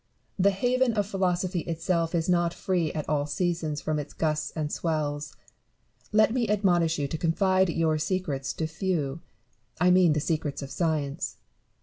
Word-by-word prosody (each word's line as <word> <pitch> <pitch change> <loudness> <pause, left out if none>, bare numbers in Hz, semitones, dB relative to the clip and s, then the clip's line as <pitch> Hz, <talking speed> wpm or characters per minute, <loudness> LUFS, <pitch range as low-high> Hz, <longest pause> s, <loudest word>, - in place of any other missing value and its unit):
The 195 +2 +5
haven 245 +5 +1
of 205 -2 +1
philosophy 185 -2 0
itself 165 +1 -1
is 165 -1 0
not 175 -1 +2
free 175 -4 0
at 155 - -4
all 145 -1 0
seasons 160 -1 -1
from 155 -1 -1
its 145 - -7
gusts 155 -1 0
and 155 -2 -2
swells. 150 -3 -2 0.8
Let 215 +1 +4
me 240 -4 0
admonish 175 -6 +2
you 145 -1 -1
to 160 +3 -4
confide 185 +3 +2
your 160 -2 +1
bccrcts 150 -4 -2
to 160 - -2
few: 160 -3 -2 0.6
I 180 +2 +5
mean 180 -3 +5
the 150 - +1
secrets 150 -2 -2
of 135 - -8
science. 155 -5 -1
165 Hz, 160 wpm, -27 LUFS, 150-185 Hz, 0.8 s, The